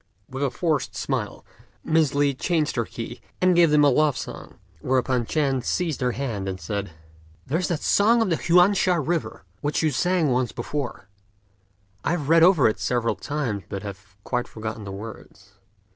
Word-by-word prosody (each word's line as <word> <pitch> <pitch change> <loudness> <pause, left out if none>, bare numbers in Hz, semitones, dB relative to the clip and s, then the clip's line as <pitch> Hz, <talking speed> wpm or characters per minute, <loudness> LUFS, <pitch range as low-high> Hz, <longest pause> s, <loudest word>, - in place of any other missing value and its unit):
With 130 +1 -6
a 140 - +2
forced 155 +2 -1
smile, - - -3 0.4
Miss 155 -3 +2
Li 145 -1 +3
changed 155 +3 0
her 115 -2 0
key, 115 +1 -7 0.2
and 185 -1 +4
gave 170 -1 +6
them 150 0 +4
a 145 - +6
love 150 +1 +2
song; - - -8 0.2
whereupon 130 -1 0
Ch'ên 135 -5 0
seized 165 -3 -1
her 125 -1 +1
hand, 110 -8 -3
and 95 -1 -5
said, 100 +3 -4 0.6
"There's 160 +7 -1
that 170 -4 -2
song 225 +4 +4
of 190 - -2
the 165 - +2
Huan 180 +3 +4
sha 185 -2 +2
river, 165 +1 -2 0.2
which 145 +2 -1
you 155 - +2
sang 170 +1 +1
once 125 0 0
before; 125 -3 -5 1.0
I - - +1
have 150 -5 -3
read 165 0 +6
it 170 - +9
over 150 - +4
several 120 -2 0
times, 130 -9 -3
but 100 0 -5
have 100 -1 -9
quite 125 -1 -2
forgotten 110 -1 -6
the 100 - -6
words." 105 0 -10
140 Hz, 180 wpm, -24 LUFS, 115-165 Hz, 1.0 s, it